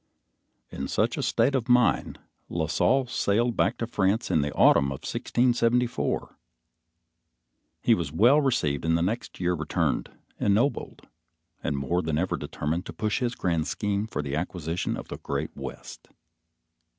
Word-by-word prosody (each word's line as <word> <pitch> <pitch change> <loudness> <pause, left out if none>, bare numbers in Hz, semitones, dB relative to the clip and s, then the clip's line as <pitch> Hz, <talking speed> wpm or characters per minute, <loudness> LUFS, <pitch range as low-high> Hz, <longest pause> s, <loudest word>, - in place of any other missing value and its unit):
In - - -4
such - - 0
state 120 +5 +2
of 125 -3 -1
mind, 125 -1 +3 0.3
La 80 -2 -1
Salle 130 - +2
sailed 120 0 +1
back 105 - +1
to 115 - -2
France 105 0 0
in 80 - +3
the 75 0 -2
autumn 70 - +5
of 70 -1 -4
1674. 120 0 0 1.4
He 120 - +5
was 85 -9 -1
well 120 - +5
received 75 - 0
and 80 +1 +2
the 85 - 0
next 110 +7 -3
year 90 0 +1
returned, 80 -2 -1 0.3
ennobled, 110 +8 0 0.6
and 75 - -1
more 75 +7 0
than 80 -2 -1
ever 90 +4 0
determined 80 +5 -3
to - - -7
push 105 +1 -1
his 125 -1 -1
grand 85 -5 -1
scheme 105 +2 -1
for - - -3
the 70 0 -3
acquisition 85 0 -3
of - - -9
the - - -5
great 70 +2 -4
West. - - -9
95 Hz, 150 wpm, -26 LUFS, 80-120 Hz, 1.4 s, autumn